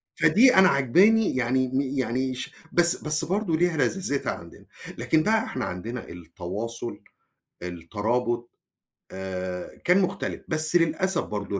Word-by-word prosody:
فدي 250 Hz, +3 st, +5 dB
أنا 190 Hz, -1 st, +7 dB
عاجباني، 185 Hz, -, +3 dB
يعني 130 Hz, +1 st, +1 dB
م 130 Hz, +1 st, 0 dB
يعني 130 Hz, -1 st, -1 dB
ش 125 Hz, -, -6 dB, 0.2 s
بس 175 Hz, 0 st, +3 dB
بس 155 Hz, +1 st, 0 dB
برضه 185 Hz, -1 st, 0 dB
ليها 175 Hz, 0 st, +1 dB
لذاذتها 145 Hz, -3 st, -1 dB
عندنا، 85 Hz, 0 st, -12 dB, 0.3 s
لكن 155 Hz, -1 st, +2 dB
بقى 220 Hz, +3 st, +2 dB
إحنا 130 Hz, -, -4 dB
عندنا 115 Hz, +7 st, -6 dB
التواصُل، 95 Hz, +8 st, -6 dB, 0.6 s
الترابُط 110 Hz, +8 st, -2 dB, 0.6 s
آآ 95 Hz, -1 st, -6 dB
كان 180 Hz, +3 st, +4 dB
مختلِف 185 Hz, -, -3 dB
بس 155 Hz, +1 st, +2 dB
للأسف 170 Hz, +2 st, +2 dB
برضه 100 Hz, -1 st, -4 dB
130 Hz, 130 wpm, -25 LUFS, 105-170 Hz, 0.6 s, أنا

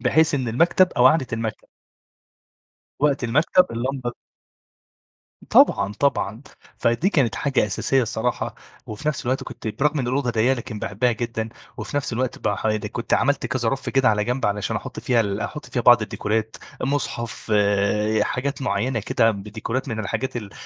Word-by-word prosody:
بحيث 155 Hz, +5 st, +3 dB
إن 130 Hz, -4 st, -1 dB
المكتب 170 Hz, +9 st, +3 dB
أو 125 Hz, -, +5 dB
قعدة 145 Hz, -1 st, +4 dB
المكتب 115 Hz, -1 st, -4 dB, 1.3 s
وقت 145 Hz, -3 st, +2 dB
المكتب 150 Hz, +9 st, +3 dB
اللمبة 120 Hz, +1 st, -3 dB, 1.4 s
طبعًا 100 Hz, 0 st, +5 dB
طبعًا، 115 Hz, -2 st, 0 dB, 0.3 s
فدي 120 Hz, +11 st, +1 dB
كانت 140 Hz, -, +1 dB
حاجة 135 Hz, -6 st, +1 dB
أساسية 130 Hz, +6 st, +1 dB
الصراحة 120 Hz, +1 st, -2 dB, 0.3 s
وفي 110 Hz, +8 st, -4 dB
نفس 150 Hz, -, -1 dB
الوقت 130 Hz, +2 st, 0 dB
كنت 110 Hz, -, -7 dB
برغم 145 Hz, +8 st, 0 dB
إن 125 Hz, -, -1 dB
الأوضة 130 Hz, -1 st, 0 dB
ضيّقة 120 Hz, +4 st, +2 dB
لكن 115 Hz, -3 st, -6 dB
باحبها 115 Hz, +5 st, 0 dB
جدًا 115 Hz, -1 st, -3 dB, 0.3 s
وفي 145 Hz, -, -5 dB
نفس 140 Hz, -3 st, -1 dB
الوقت 125 Hz, +2 st, -2 dB
بقى 100 Hz, -, -1 dB
ح -, -, -2 dB, 0.3 s
كنت 115 Hz, -, 0 dB
عملت 140 Hz, 0 st, +1 dB
كذا 120 Hz, -3 st, -1 dB
رف 135 Hz, -, -2 dB
كده 135 Hz, -3 st, +3 dB
على 105 Hz, -1 st, +2 dB
جنب 125 Hz, +1 st, -1 dB
علشان 105 Hz, 0 st, -1 dB
أحط -, -, -6 dB
فيها 120 Hz, -2 st, +2 dB
ال 100 Hz, -1 st, -2 dB
أحط 150 Hz, -1 st, -5 dB
فيها 120 Hz, -, -2 dB
بعض 120 Hz, -1 st, +7 dB
الديكورات، 110 Hz, +1 st, -2 dB, 0.2 s
مصحف 120 Hz, -5 st, -3 dB, 0.7 s
حاجات 140 Hz, +4 st, -2 dB
معينة 115 Hz, +2 st, 0 dB
كده 115 Hz, +2 st, +2 dB
بديكورات 110 Hz, +6 st, -4 dB
من 110 Hz, -3 st, -3 dB
الحاجات 115 Hz, +5 st, -3 dB
ال 105 Hz, -4 st, -6 dB
120 Hz, 160 wpm, -23 LUFS, 110-135 Hz, 1.4 s, بعض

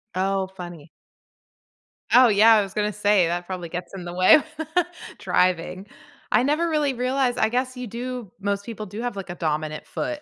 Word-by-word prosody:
Oh, 190 Hz, 0 st, 0 dB
funny. 175 Hz, -4 st, -10 dB, 1.3 s
Oh, 250 Hz, 0 st, +8 dB
yeah, 215 Hz, +2 st, +6 dB
I 210 Hz, -, +4 dB
was 195 Hz, -1 st, -6 dB
gonna 210 Hz, 0 st, -1 dB
say 205 Hz, -4 st, +3 dB
that 175 Hz, +1 st, -2 dB
probably 180 Hz, -2 st, -6 dB
gets 180 Hz, +2 st, -6 dB
in 180 Hz, -2 st, -7 dB
the 175 Hz, -, -6 dB
way 185 Hz, +1 st, +7 dB
of 305 Hz, -, +3 dB, 0.7 s
driving. 180 Hz, +2 st, 0 dB, 0.4 s
I -, -, +4 dB
never 305 Hz, +5 st, +1 dB
really 300 Hz, -4 st, +1 dB
realized 255 Hz, 0 st, 0 dB
I 220 Hz, -, +2 dB
guess 255 Hz, +2 st, -1 dB
you 250 Hz, -1 st, -5 dB
do 240 Hz, -2 st, -6 dB
most 200 Hz, 0 st, -2 dB
people 220 Hz, -2 st, -6 dB
do 210 Hz, +3 st, -7 dB
have, 245 Hz, -3 st, -3 dB
like, 195 Hz, -1 st, -7 dB
a 175 Hz, -, -5 dB
dominant 155 Hz, -2 st, -3 dB
foot 300 Hz, -1 st, -4 dB
200 Hz, 190 wpm, -24 LUFS, 180-245 Hz, 1.3 s, Oh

